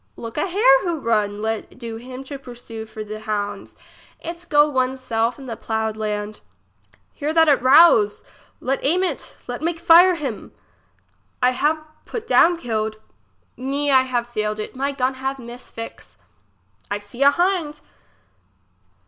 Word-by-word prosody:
Look 230 Hz, -1 st, -8 dB
a 300 Hz, -, 0 dB
hare -, -, +5 dB
who 340 Hz, -4 st, -2 dB
run! 210 Hz, -4 st, 0 dB
let 220 Hz, 0 st, -3 dB
do 230 Hz, -2 st, -6 dB
him 255 Hz, +3 st, -9 dB
to 275 Hz, +1 st, -8 dB
pursue 240 Hz, -3 st, -9 dB
for 215 Hz, 0 st, -7 dB
the 215 Hz, 0 st, -7 dB
hounds! 205 Hz, -2 st, -4 dB, 0.4 s
it 340 Hz, +1 st, -8 dB
go 295 Hz, 0 st, +5 dB
one's 260 Hz, -2 st, 0 dB
self 230 Hz, -1 st, -1 dB
in 275 Hz, -, -10 dB
the 235 Hz, -3 st, -5 dB
ploughed 220 Hz, -1 st, -2 dB
land. 210 Hz, -1 st, -4 dB, 0.7 s
Here 295 Hz, +1 st, -2 dB
that 325 Hz, 0 st, +4 dB
it 285 Hz, -3 st, +4 dB
rouse. 255 Hz, -6 st, +6 dB, 0.4 s
Let 270 Hz, +1 st, -1 dB
aim 350 Hz, +7 st, +2 dB
it! 340 Hz, -7 st, -3 dB
let 245 Hz, +1 st, -5 dB
make 335 Hz, +1 st, -1 dB
fire 345 Hz, +2 st, +7 dB
him! 275 Hz, -9 st, -5 dB, 0.9 s
I 250 Hz, -, +4 dB
have 305 Hz, +4 st, 0 dB, 0.2 s
put 460 Hz, -2 st, -6 dB
down 350 Hz, -5 st, +5 dB
killed. 220 Hz, -6 st, -2 dB, 0.6 s
Me, 280 Hz, +3 st, -1 dB
I 260 Hz, -1 st, +6 dB
have 250 Hz, -2 st, -1 dB
failed 215 Hz, -3 st, -3 dB
it; 215 Hz, -, -6 dB
my 275 Hz, +2 st, -1 dB
gun 265 Hz, -1 st, 0 dB
have 270 Hz, +1 st, -2 dB
miss 240 Hz, 0 st, -10 dB
fixe. 230 Hz, 0 st, -9 dB, 0.7 s
1 205 Hz, -, -2 dB
see 205 Hz, +5 st, -11 dB
a 280 Hz, -, +8 dB
hind. 340 Hz, -2 st, 0 dB
255 Hz, 160 wpm, -22 LUFS, 220-300 Hz, 0.9 s, a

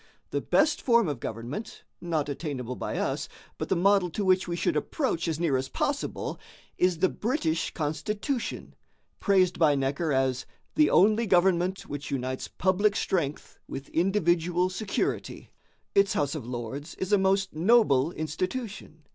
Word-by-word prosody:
The -, -, -1 dB
best 305 Hz, 0 st, +2 dB
form 235 Hz, -5 st, +4 dB
of 145 Hz, -5 st, -3 dB
government, 125 Hz, -, -6 dB, 0.2 s
not 160 Hz, -4 st, -1 dB
attainable 140 Hz, -4 st, -4 dB
by -, -, -4 dB
us, -, -, -2 dB, 0.3 s
but -, -, -3 dB
the -, -, +3 dB
model 190 Hz, 0 st, +3 dB
to 200 Hz, +4 st, -3 dB
which 185 Hz, 0 st, +3 dB
we 170 Hz, -, -2 dB
should 165 Hz, -, 0 dB
approach 170 Hz, -, -1 dB
as 160 Hz, -1 st, -1 dB
near 160 Hz, -6 st, +2 dB
as 130 Hz, +1 st, -3 dB
possible, 285 Hz, 0 st, -2 dB, 0.4 s
is 180 Hz, -2 st, +2 dB
the 185 Hz, +3 st, +3 dB
British 205 Hz, -, -1 dB
constitution, 205 Hz, -, -3 dB, 0.5 s
praised 185 Hz, -2 st, +3 dB
by 155 Hz, -3 st, +5 dB
Necker 140 Hz, +4 st, -1 dB
as 130 Hz, -1 st, 0 dB, 0.3 s
'the 305 Hz, 0 st, +4 dB
only 215 Hz, +4 st, +4 dB
government 185 Hz, 0 st, +3 dB
which 145 Hz, 0 st, -7 dB
unites 130 Hz, -1 st, -3 dB
public 200 Hz, +3 st, +1 dB
strength 155 Hz, -9 st, -2 dB
with 135 Hz, 0 st, -7 dB
individual 175 Hz, -1 st, +1 dB
security.' 195 Hz, +1 st, -3 dB, 0.4 s
Its 200 Hz, 0 st, +4 dB
house 145 Hz, 0 st, 0 dB
of 140 Hz, -7 st, -6 dB
lords 125 Hz, +5 st, -5 dB
is 190 Hz, +2 st, -2 dB
a 205 Hz, -, +6 dB
most 195 Hz, 0 st, +1 dB
noble 165 Hz, -, +4 dB
institution. 180 Hz, +1 st, -4 dB
175 Hz, 150 wpm, -27 LUFS, 145-195 Hz, 0.5 s, a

